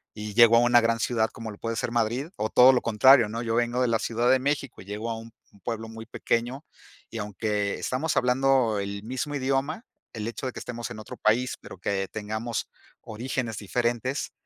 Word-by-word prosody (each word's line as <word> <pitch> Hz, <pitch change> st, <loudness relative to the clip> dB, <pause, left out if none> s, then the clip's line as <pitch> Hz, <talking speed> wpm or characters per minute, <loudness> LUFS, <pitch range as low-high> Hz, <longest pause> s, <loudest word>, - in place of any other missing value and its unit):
y 105 Hz, -1 st, -6 dB
llego 115 Hz, +1 st, +7 dB
a -, -, +7 dB
una 120 Hz, 0 st, +5 dB
gran 115 Hz, 0 st, +1 dB
ciudad 110 Hz, -2 st, +1 dB
como 115 Hz, -1 st, -7 dB
lo 100 Hz, -, -12 dB
puede 115 Hz, 0 st, -3 dB
ser 115 Hz, -, -2 dB
Madrid, 120 Hz, +4 st, 0 dB
o 110 Hz, -, -1 dB
todo 125 Hz, +1 st, +7 dB
lo 125 Hz, -, +2 dB
contrario, 115 Hz, +1 st, +5 dB
¿no? 115 Hz, +2 st, -4 dB
Yo 115 Hz, -, -1 dB
vengo 120 Hz, +1 st, +1 dB
de 125 Hz, -, +3 dB
la 115 Hz, -1 st, +2 dB
Ciudad 120 Hz, +2 st, +1 dB
de 130 Hz, -, +4 dB
México 140 Hz, -3 st, -2 dB
y -, -, -13 dB
llego 105 Hz, +3 st, -4 dB
a 110 Hz, -, -3 dB
un 115 Hz, 0 st, -10 dB, 0.3 s
pueblo 115 Hz, -1 st, -4 dB
muy 115 Hz, 0 st, -9 dB
pequeño, 125 Hz, +5 st, -2 dB, 0.5 s
y 115 Hz, -, -5 dB
aunque 105 Hz, 0 st, -2 dB
estamos 145 Hz, +6 st, -2 dB
hablando 125 Hz, -3 st, +3 dB
el 100 Hz, 0 st, -4 dB
mismo 130 Hz, +5 st, -3 dB
idioma, 140 Hz, -, -1 dB, 0.3 s
el 110 Hz, -1 st, -4 dB
hecho 120 Hz, +3 st, -4 dB
de 130 Hz, -, -5 dB
que -, -, -7 dB
estemos 120 Hz, -2 st, -6 dB
en 115 Hz, -, -8 dB
otro 110 Hz, -, -9 dB
país, 120 Hz, +4 st, +1 dB
pero -, -, -11 dB
que 95 Hz, +1 st, -1 dB
tengamos 110 Hz, +2 st, -4 dB, 0.3 s
orígenes 115 Hz, 0 st, -4 dB
diferentes, 120 Hz, +6 st, -1 dB
115 Hz, 210 wpm, -26 LUFS, 110-125 Hz, 0.5 s, llego